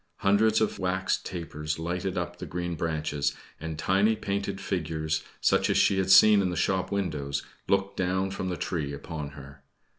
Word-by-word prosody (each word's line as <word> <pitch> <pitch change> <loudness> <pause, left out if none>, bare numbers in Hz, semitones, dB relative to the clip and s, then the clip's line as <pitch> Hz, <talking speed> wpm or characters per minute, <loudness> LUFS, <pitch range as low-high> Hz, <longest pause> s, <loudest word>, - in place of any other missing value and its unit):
Hundreds 105 +2 +4
of 110 - 0
wax 95 0 0
tapers 75 -3 -5
lighted 90 +3 -3
up 90 0 -3
the - - -6
green 90 0 -3
branches, 75 -3 -1 0.2
and 80 0 -5
tiny 100 +7 +3
painted 100 -1 -3
figures, 80 -5 -2 0.2
such - - +3
as - - +2
she 95 - +4
had 95 0 0
seen 100 +2 +8
in 95 - +1
the 90 - -3
shop 95 +1 0
windows, 75 -8 -2 0.2
looked 100 0 +1
down 95 +1 0
from 95 -1 -3
the 90 - -3
tree 75 -6 -2
upon 75 +1 -6
her. 70 0 -12
90 Hz, 175 wpm, -28 LUFS, 80-95 Hz, 0.2 s, seen